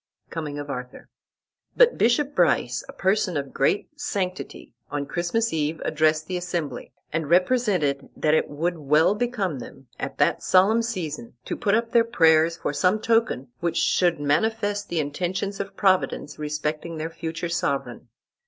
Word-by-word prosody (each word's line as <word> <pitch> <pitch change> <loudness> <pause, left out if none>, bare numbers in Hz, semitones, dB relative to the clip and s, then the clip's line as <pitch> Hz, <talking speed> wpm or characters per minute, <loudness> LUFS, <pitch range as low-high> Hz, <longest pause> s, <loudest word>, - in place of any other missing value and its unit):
Coming 150 -3 -4
of 145 0 -5
Arthur. 125 -2 -7 0.7
But - - +6
Bishop 270 +5 +2
Brice, - - +2
a - - -5
person 190 -3 0
of 140 -1 -4
great 140 +9 +1
sanctity, 185 - -4 0.2
on 145 -1 -3
Christmas 175 +9 -1
eve 155 0 -1
addressed 155 0 +2
the 180 +1 -3
assembly, 175 -4 -4 0.2
and 160 -3 -2
represented 180 - +2
that 155 -1 +2
it 155 - +2
would 165 +4 -2
well 150 +5 +4
become 210 - -2
them, 125 +1 -11
at - - -5
that - - +2
solemn 200 +5 +4
season, 165 - -5
to - - -3
put 210 -3 +1
up 230 0 0
their 235 - +5
prayers 165 -7 +4
for 145 - -3
some 180 +8 +2
token 225 - +1
which 170 +1 -1
should 175 -4 +2
manifest 205 +7 0
the 170 - -1
intentions 185 +7 -2
of 195 0 -5
Providence 185 -6 +1
respecting 150 +2 -3
their 160 +1 -4
future 165 +1 -4
sovereign. 140 -8 -2
170 Hz, 155 wpm, -24 LUFS, 150-205 Hz, 0.7 s, But